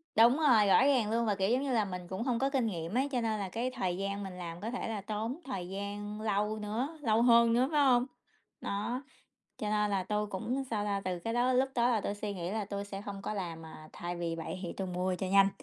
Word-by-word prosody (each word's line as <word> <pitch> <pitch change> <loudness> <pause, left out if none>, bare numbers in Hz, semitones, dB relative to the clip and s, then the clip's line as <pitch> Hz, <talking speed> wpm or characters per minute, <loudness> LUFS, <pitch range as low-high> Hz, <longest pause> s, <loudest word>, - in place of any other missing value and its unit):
Đúng 235 +5 +6
rồi, 245 -10 +5
rõ 200 - +6
ràng 250 -7 +3
luôn. 230 0 +2
Và, 205 -2 +1
kiểu 195 0 +1
giống 255 +4 +2
như 275 - -1
là, 220 -3 +3
mình 180 -2 -6
cũng 190 +5 -3
hông 245 -2 0
có 270 - +2
kinh 265 -4 +1
nghiệm 170 -3 -3
ấy, 275 +2 +2
cho 250 - 0
nên 220 -2 0
là 195 -2 -3
cái 235 +6 -2
thời 185 -8 -2
gian 200 +1 -2
mình 190 -2 -7
làm 170 -1 -6
có 225 +3 -3
thể 245 - -3
là 220 -3 -3
tốn 220 +6 -3
thời 190 -10 -4
gian 205 +2 -5
lâu 210 0 0
nữa, 235 +10 -3
lâu 225 -3 +3
hơn 235 -1 +6
nữa, 250 +3 +3
phải 295 -2 +4
hông? 245 -2 +5 0.6
Nó. 235 +6 -2 0.6
Cho 210 - -2
nên 210 -1 +2
là 195 -2 0
tôi 210 +2 -1
cũng, 240 +7 -2
sao 210 -3 0
ta, 200 -1 0
từ 180 -1 -2
cái 225 +7 -3
đó 245 +2 +2
lúc 260 +1 +3
đó 240 0 +3
là 230 -3 +2
tui 200 - -2
suy 205 0 -4
nghĩ 175 -1 -4
là 215 0 -1
tui 200 0 -4
sẽ 200 -1 -7
không 200 -2 -6
có 215 - -3
làm, 165 -5 -5
à 155 -1 -11
thay 175 0 -5
vì 170 -1 -2
vậy 165 +3 -5
thì 175 - -4
tui 190 - -4
mua 180 +1 -1
cho 185 +1 -3
nhanh. 195 +1 +6
210 Hz, 270 wpm, -32 LUFS, 190-235 Hz, 0.6 s, Đúng